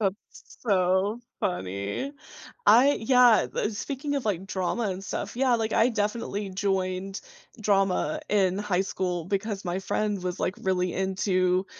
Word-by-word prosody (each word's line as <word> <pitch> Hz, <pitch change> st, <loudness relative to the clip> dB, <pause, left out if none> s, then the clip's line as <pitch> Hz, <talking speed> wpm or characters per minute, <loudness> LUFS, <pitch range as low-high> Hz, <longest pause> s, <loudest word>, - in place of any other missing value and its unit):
That's 195 Hz, -1 st, +1 dB, 0.4 s
so 195 Hz, +1 st, +1 dB, 0.2 s
funny. 100 Hz, -, -3 dB, 0.5 s
I 270 Hz, +5 st, +7 dB
yeah, 245 Hz, -2 st, +5 dB
uh, -, -, 0 dB
speaking 275 Hz, +6 st, -4 dB
of, 270 Hz, -, -3 dB
like, 195 Hz, -3 st, -1 dB
drama 195 Hz, +5 st, -1 dB
and 190 Hz, +1 st, -5 dB
stuff, -, -, -4 dB
yeah, 255 Hz, -1 st, +3 dB
like, 220 Hz, -1 st, -1 dB
I 235 Hz, +3 st, +4 dB
definitely 210 Hz, -2 st, -2 dB
joined 190 Hz, 0 st, -2 dB, 0.4 s
drama 195 Hz, -6 st, +1 dB
in 190 Hz, -3 st, +3 dB
high 205 Hz, -3 st, 0 dB
school 180 Hz, -3 st, -3 dB
because 200 Hz, +1 st, -2 dB
my 175 Hz, +1 st, -1 dB
friend 205 Hz, 0 st, -1 dB
was, 180 Hz, 0 st, -3 dB
like, 185 Hz, -, 0 dB
really 180 Hz, -2 st, 0 dB
into, 185 Hz, -1 st, +1 dB
195 Hz, 140 wpm, -27 LUFS, 185-220 Hz, 0.5 s, I